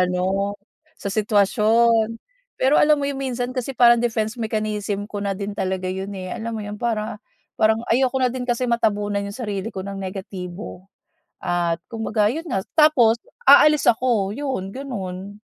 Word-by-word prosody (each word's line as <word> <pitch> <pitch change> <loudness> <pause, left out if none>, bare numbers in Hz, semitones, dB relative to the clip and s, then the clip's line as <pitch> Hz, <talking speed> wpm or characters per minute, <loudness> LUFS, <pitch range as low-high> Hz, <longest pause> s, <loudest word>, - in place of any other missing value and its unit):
ano, 190 +3 0 0.4
sa 200 - -5
sitwasyon. 220 +2 +3 0.4
Pero 270 +3 +3
alam 300 0 +5
mo 285 - -2
yun, 280 -1 -3
minsan 250 -1 -2
kasi 255 0 -4
parang 240 -1 +6
defense 230 0 -1
mechanism 215 -2 -2
ko 205 -1 -6
na 200 -1 -2
din 200 +1 -4
talaga 185 -1 -2
yun, 190 +1 -5
eh, 185 -1 -6
alam 230 0 -4
mo 215 - -5
yun, 205 0 -7
para 220 -2 -2 0.3
parang 220 +1 +2
ayoko 260 +2 +2
na 255 -2 +1
din 250 -1 -5
kasi 240 +1 0
matabunan 210 -4 0
yung 200 - -8
sarili 210 -4 -3
ko 190 -3 -6
ng 195 0 -6
negatibo. 190 0 -7 0.5
At 170 -1 -1
kumbaga 220 -2 -1
yun 325 - -4
nga 190 0 -2
tapos 300 -8 +5 0.3
aalis 300 -1 +7
ako 225 -4 +2
yun, 255 -9 -4
gano'n. 200 -7 -6
215 Hz, 160 wpm, -22 LUFS, 195-240 Hz, 0.5 s, aalis